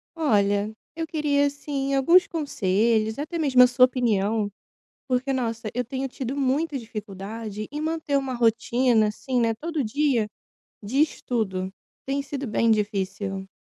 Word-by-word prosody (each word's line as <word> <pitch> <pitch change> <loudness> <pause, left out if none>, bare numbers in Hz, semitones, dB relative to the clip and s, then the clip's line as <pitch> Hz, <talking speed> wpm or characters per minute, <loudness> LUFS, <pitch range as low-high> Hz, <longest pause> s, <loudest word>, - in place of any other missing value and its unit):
Olha, 210 -7 +1 0.2
eu 325 0 -3
queria, 295 -2 +1
assim, 280 -1 -2
alguns 345 +9 +5
conselhos, 220 - +1
até 310 +4 -4
mesmo 260 -5 +6
a - - +7
sua 250 0 +6
opinião, 220 -4 0 0.6
porque, 260 +1 0
nossa, 230 -3 -2
eu 250 - 0
tenho 265 +3 -3
tido 260 +1 -5
muita 285 +3 0
dificuldade 215 -1 -6
em 295 +1 -5
manter 315 -2 0
uma 270 -2 -2
rotina 235 0 +3
assim, 250 +3 -2
né, 230 -1 +2
todo 315 +4 -3
dia 250 -2 +1 0.5
de 255 +8 +1
estudo. 195 -10 -1 0.3
Tem 275 +1 -1
sido 280 0 -5
bem 230 0 +1
difícil. 195 -2 -1
250 Hz, 140 wpm, -25 LUFS, 215-280 Hz, 0.6 s, a